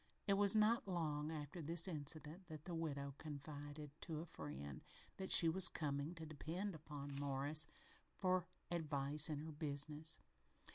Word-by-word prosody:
It 200 - +3
was 200 +1 +6
not 215 +1 +4
long 155 -4 -1
after 155 +2 -5
this 165 +3 +2
incident 155 +2 -3
that 155 -3 -9
the 180 - -5
widow 140 -4 -3
confided 145 0 -7
to 160 -3 -3
a 165 - -5
friend 70 - -7 0.4
that 190 0 -4
she 165 - +10
was 185 +3 +4
coming 145 +2 -2
to 160 -1 -7
depend 165 +6 -4
upon 145 -3 -7
Morris 145 +2 +4 0.5
for 185 -2 +1 0.2
advice 150 -3 +1
in 150 - -2
her 155 +2 -6
business. 150 +1 +1
155 Hz, 150 wpm, -42 LUFS, 145-170 Hz, 0.5 s, she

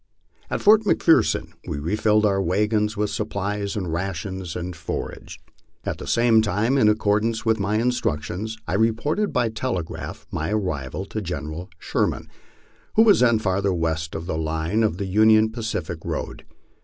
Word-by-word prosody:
At - - -2
Fort 215 +1 +7
McPherson 170 -5 +3 0.2
we - - -3
refilled 105 +7 +2
our 100 -1 +2
wagons 105 +3 +1
with 105 0 0
supplies 100 0 -3
of 105 - -2
rations 90 +1 -4
and 90 0 -4
for 80 +1 -4
age. - - -11 0.5
At - - -3
the - - -7
same 115 -2 +4
time, 110 +4 +1
in 110 -6 +5
accordance 110 +2 +1
with 110 -1 +2
my 100 +2 0
instructions, 110 -3 -1
I 85 - -2
reported 115 - +1
by 120 -2 +1
tel 120 +3 -2
egraph 80 -2 -6
my 80 +1 -2
arrival 90 -5 -2
to 110 - -5
General 80 -1 -5
Sherman, - - -1 0.7
who 225 - +7
was 215 -3 +6
then 120 -2 +4
further 100 -2 0
west 80 -1 -2
on 80 - -4
the 80 -3 -2
line 80 +6 -1
of 105 -6 +1
the 100 - -3
Union 110 +3 +4
Pacific 110 -8 -4
road. - - -5
105 Hz, 165 wpm, -23 LUFS, 90-110 Hz, 0.7 s, Fort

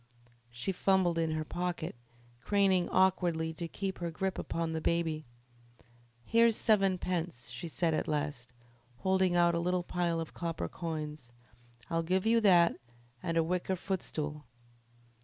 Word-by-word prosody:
She 120 +9 -3
fumbled 185 -2 +2
in 165 -1 +1
her 155 0 -2
pocket, 175 -2 -3 0.5
craning 195 -1 +3
awkwardly 175 -4 +2
to 170 +1 -5
keep 195 +3 -4
her 170 -1 -2
grip 190 +3 -2
upon 165 -1 -2
the 160 - -2
baby. 160 -2 0 1.0
"Here's 230 0 +4
sevenpence," 180 - +1
she 125 +8 -5
said 165 0 0
at - - -1
last, 145 -5 -2 0.5
holding 190 -1 +2
out 175 0 +4
a 170 - +1
little 180 +1 0
pile 175 -1 -1
of 165 - -5
copper 165 -1 -3
coins. 155 -6 -5 0.6
"I'll 165 0 +2
give 185 +4 0
you 230 +1 +4
that 175 -5 +5 0.4
and 165 0 -1
a 165 - +4
wicker 180 +3 -1
footstool." 155 -6 -4
170 Hz, 140 wpm, -32 LUFS, 160-185 Hz, 1.0 s, that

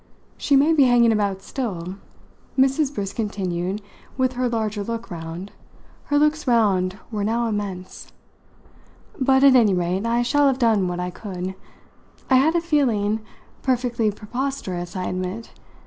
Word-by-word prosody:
She 285 - +1
may 290 +4 +5
be 290 -4 +5
hanging 240 -2 +5
about 200 -3 0
still," 190 -10 -4 0.6
Mrs. 270 +2 +3
Briss 200 -8 -4
continued, 195 -2 -3 0.3
with 260 -1 +1
her 250 0 0
larger 215 -3 -2
look 230 -2 -5
round 170 +3 -6 0.5
her 290 - +1
looks 300 0 +2
round 195 -6 +2
were 210 -2 -2
now 230 +3 0
immense; 200 -4 -5 1.1
"but 265 0 +3
at 275 -2 +7
any 215 -6 +5
rate 180 +4 -1
I 235 +1 +2
shall 290 +4 +3
have 265 -2 +2
done 225 -7 +2
what 180 0 -3
I 180 0 -3
could. 185 -1 -6 0.8
I 260 - +7
had 310 +6 +3
a 340 - +3
feeling 235 -10 +1 0.4
perfectly 245 -3 +1
preposterous, 210 -5 -4
I 185 - -2
admit! 185 +5 -4
220 Hz, 150 wpm, -23 LUFS, 190-260 Hz, 1.1 s, at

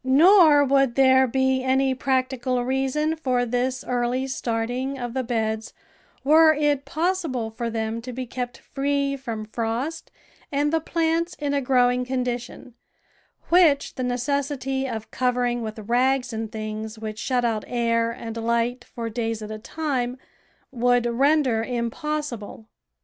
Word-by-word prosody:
Nor 305 +2 +6
would 270 -3 +2
there 260 -1 +5
be 265 +1 +1
any 265 0 +2
practical 255 -1 0
reason 270 +4 0
for 255 -6 0
this 250 +2 -1
early 250 +1 -1
starting 250 +1 -2
of 245 -2 -5
the 260 - 0
beds 220 -2 -2 0.5
were 315 +2 +6
it 290 -2 +1
possible 315 -9 -1
for 235 +1 -3
them 225 0 -3
to 250 +2 -7
be 255 +1 -5
kept 245 0 -5
free 280 0 -1
from 230 -5 -5
frost 230 +8 -3 0.4
and 290 +2 +1
the 325 - +3
plants 330 +1 0
in 290 -1 -2
a 280 - +1
growing 250 -1 +3
condition, 250 -1 -4 0.8
which 330 -5 +4
the - - -5
necessity 265 +1 -1
of 220 -2 -6
covering 245 -1 0
with 220 -1 -5
rags 250 +3 +1
and 220 -1 -4
things 215 0 -5
which 215 -1 -6
shut 250 0 0
out 220 -2 0
air 230 -1 +1
and 230 -1 -6
light 235 +2 0
for 230 -1 -6
days 225 -1 -3
at 215 - -7
a 215 - -6
time, 255 -1 -2 0.5
would 245 -1 +2
render 255 -1 +2
impossible. 240 -1 -4
250 Hz, 145 wpm, -24 LUFS, 235-275 Hz, 0.8 s, Nor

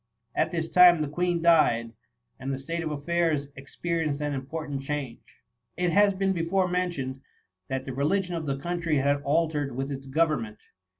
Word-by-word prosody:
At - - +1
this 165 -2 -2
time 175 -2 +6
the - - -2
Queen 175 +3 -1
died, 115 -9 +4 0.5
and 135 +1 -4
the 135 - -2
state 165 +5 -4
of 160 - -3
affairs 150 -1 0
expe 165 +5 -4
rienced 145 -2 -1
an 145 -1 -2
important 140 +1 -4
change. 135 -4 -4 0.6
It 180 -1 +1
has 200 +1 +4
been 195 0 +1
before 180 +2 +1
mentioned, 175 -8 -2 0.5
that 130 0 -3
the - - -4
reli 140 +9 +1
gion 180 -1 -5
of 160 -2 -4
the 135 -1 -1
country 170 +1 -1
had 140 +1 +1
altered 145 -2 0
with 135 +2 -3
its 135 0 -6
go 155 +5 +3
vernment. 115 -9 -4
150 Hz, 185 wpm, -27 LUFS, 135-170 Hz, 0.6 s, time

